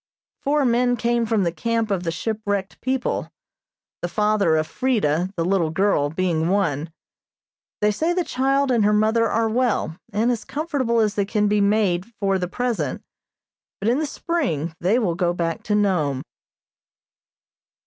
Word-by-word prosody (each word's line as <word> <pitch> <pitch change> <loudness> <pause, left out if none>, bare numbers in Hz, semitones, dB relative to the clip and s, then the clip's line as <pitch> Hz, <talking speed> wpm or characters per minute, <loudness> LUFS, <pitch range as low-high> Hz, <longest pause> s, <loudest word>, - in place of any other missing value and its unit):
Four 290 0 +1
men 245 0 +2
came 235 0 +1
from 215 -3 +2
the 170 - +1
camp 230 +3 -1
of 190 -3 0
the 170 -2 -2
shipwrecked 205 +1 -3
people, 260 0 -1 0.7
the 175 - -1
father 210 -4 +2
of 155 0 0
Freda, 190 - 0
the 165 - -1
little 180 -3 +1
girl, 165 -4 +1
being 165 0 0
one. 165 -6 0 0.9
They 210 0 +4
say 320 +11 0
the 355 0 +1
child 270 -1 +1
and 235 -4 +3
her 210 +1 +3
mother 220 +2 +3
are 225 0 +1
well, 225 -8 0 0.2
and 220 +4 +1
as 235 - -2
comfortable 270 -5 -1
as 210 -2 +1
they 205 -1 0
can 210 0 +1
be 205 0 +2
made 200 -3 +2
for 195 -1 +1
the 180 - -2
present, 210 - -2 0.8
but 200 - -2
in 250 +4 +2
the 310 - -1
spring 255 - -2
they 190 +7 +2
will 210 -9 +1
go 175 0 0
back 165 -2 -2
to 210 - +1
Nome. 155 -10 +1
210 Hz, 165 wpm, -22 LUFS, 175-235 Hz, 0.9 s, They